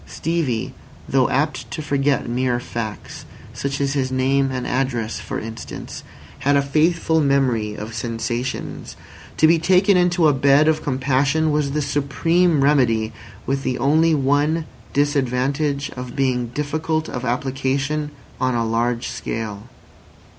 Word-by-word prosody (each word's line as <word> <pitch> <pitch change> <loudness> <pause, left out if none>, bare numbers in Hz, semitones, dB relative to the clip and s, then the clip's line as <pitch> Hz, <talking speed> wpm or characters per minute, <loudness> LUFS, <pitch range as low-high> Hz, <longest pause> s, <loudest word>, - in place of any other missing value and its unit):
Stevie, 155 -9 -2 0.3
though 130 -2 +2
apt 150 +3 -1
to - - -5
forget 140 -1 +1
mere 125 0 0
facts, 115 -3 -6 0.3
such 140 0 -3
as 140 -1 0
his 130 -2 -1
name 135 +1 +2
and 130 -1 -3
address 125 -3 -1
for - - -4
instance, 115 0 -7 0.4
had 145 +1 +2
a - - +4
faithful 160 +3 +2
memory 130 -7 +1
of 110 +2 -7
sensations. 115 +2 -4 0.4
To - - +5
be 165 +1 +5
taken 185 +3 +4
into 175 -2 +3
a 150 - +4
bed 140 +3 +4
of 155 -1 +2
compassion 140 +3 +1
was 145 -2 0
the 150 0 0
supreme 145 +3 +1
remedy, 115 -6 +2 0.3
with 135 0 -1
the 130 -2 -1
only 155 +5 +3
one 145 +3 +1 0.3
disadvantage 140 0 0
of 125 -1 -7
being 125 -3 0
difficult 155 +4 -2
of 125 - -5
application 135 +4 -1 0.3
on 130 -1 +1
a 115 -1 +1
large 115 +2 0
scale. 105 -2 -5
135 Hz, 140 wpm, -21 LUFS, 125-150 Hz, 0.4 s, To